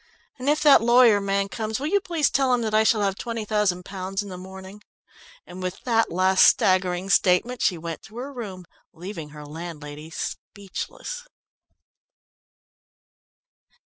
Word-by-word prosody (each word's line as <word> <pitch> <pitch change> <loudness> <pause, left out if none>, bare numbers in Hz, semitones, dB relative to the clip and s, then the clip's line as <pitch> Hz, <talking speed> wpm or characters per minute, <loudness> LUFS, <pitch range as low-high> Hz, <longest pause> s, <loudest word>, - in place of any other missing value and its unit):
"And 260 +3 -1
if 300 +1 +2
that 285 -7 +7
lawyer 235 -3 +5
man 200 0 0
comes, 220 +2 -4
will 280 - -4
you 400 +6 +2
please 335 -6 0
tell 265 -2 +3
him 240 - -2
that 215 -1 -2
I 215 0 +5
shall 220 -1 +3
have 195 -1 0
twenty 230 0 -5
thousand 205 -4 0
pounds 195 +1 -4
in 200 - -9
the 185 - -7
morning," 190 +2 -11 0.6
and 180 +1 -10
with 185 0 -4
that 230 -2 +1
last 185 +2 +4
staggering 185 0 +3
statement, 195 +7 +2
she 180 - +2
went 165 0 -6
to 220 +3 -13
her 270 +3 -6
room, 195 -8 -7 0.3
leaving 170 -3 -8
her 150 0 -11
landlady 150 -1 -8
speechless. 485 - -6
200 Hz, 155 wpm, -24 LUFS, 180-235 Hz, 0.6 s, that